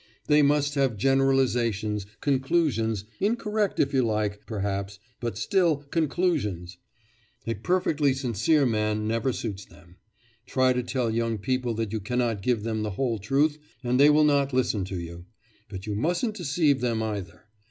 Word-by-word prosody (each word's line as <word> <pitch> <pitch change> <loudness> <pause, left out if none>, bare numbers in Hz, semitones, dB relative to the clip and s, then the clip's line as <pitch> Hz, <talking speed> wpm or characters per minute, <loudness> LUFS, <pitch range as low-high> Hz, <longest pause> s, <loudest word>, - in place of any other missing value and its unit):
They 150 0 +5
must 145 0 +2
have 135 -6 +1
generalisations, 120 -5 +1
conclusions, 130 - +1
incorrect 210 -1 0
if 140 0 +2
you 135 - +3
like, 105 -3 -1
perhaps, 100 -2 -3 0.2
but 115 -4 -4
still 170 - +2
conclusions! 135 - -1 0.7
A 115 - -1
perfectly 145 - +1
sincere 135 - +2
man 105 -2 0
never 115 +4 0
suits 105 -5 -5
them. 90 -1 -19 0.5
Try 130 -1 +3
to 125 - 0
tell 125 -2 -1
young 115 0 -1
people 125 +2 -1
that 110 -1 -3
you 110 - -1
cannot 120 -1 -1
give 115 0 0
them 110 -1 -2
the 105 - -2
whole 120 -5 0
truth, 145 +9 +1 0.2
and 125 +1 +1
they 145 +1 +7
will 150 +1 +5
not 140 -2 +2
listen 115 -6 +1
to 95 -1 -5
you. 85 +1 -9 0.4
But 95 -1 -7
you 105 - -3
mustn't 175 - 0
deceive 150 - +1
them 115 -3 0
either. 95 -5 -5
120 Hz, 155 wpm, -26 LUFS, 105-140 Hz, 0.7 s, they